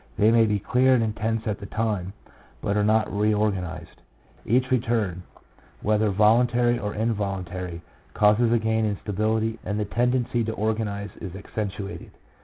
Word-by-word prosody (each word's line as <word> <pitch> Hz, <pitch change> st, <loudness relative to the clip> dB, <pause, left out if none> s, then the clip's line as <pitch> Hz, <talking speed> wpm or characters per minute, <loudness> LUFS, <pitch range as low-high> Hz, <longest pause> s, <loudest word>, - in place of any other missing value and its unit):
They 110 Hz, +2 st, +5 dB
may 115 Hz, -1 st, +5 dB
be 105 Hz, -1 st, +1 dB
clear 130 Hz, +5 st, +3 dB
and 115 Hz, -, +2 dB
intense 110 Hz, +1 st, -2 dB
at 105 Hz, -2 st, -2 dB
the 100 Hz, -, -8 dB
time, 105 Hz, -4 st, -2 dB, 0.5 s
but 100 Hz, -, -1 dB
are 105 Hz, -, +2 dB
not 110 Hz, -1 st, +2 dB
reorganized. 105 Hz, -4 st, -1 dB, 0.5 s
Each 130 Hz, +3 st, +2 dB
return, 115 Hz, -7 st, 0 dB, 0.6 s
whether 105 Hz, 0 st, +2 dB
voluntary 120 Hz, +4 st, +3 dB
or 105 Hz, 0 st, -4 dB
involuntary, 95 Hz, -5 st, -3 dB, 0.3 s
causes 105 Hz, +3 st, +4 dB
a 120 Hz, -, +4 dB
gain 110 Hz, 0 st, 0 dB
in 105 Hz, -2 st, 0 dB
stability, 110 Hz, +3 st, -1 dB
and 105 Hz, +1 st, -2 dB
the 105 Hz, -, 0 dB
tendency 120 Hz, +2 st, 0 dB
to 110 Hz, -, -2 dB
organize 105 Hz, -2 st, -2 dB
is 95 Hz, -2 st, -7 dB
accentuated. 100 Hz, 0 st, -5 dB
110 Hz, 150 wpm, -25 LUFS, 100-115 Hz, 0.6 s, They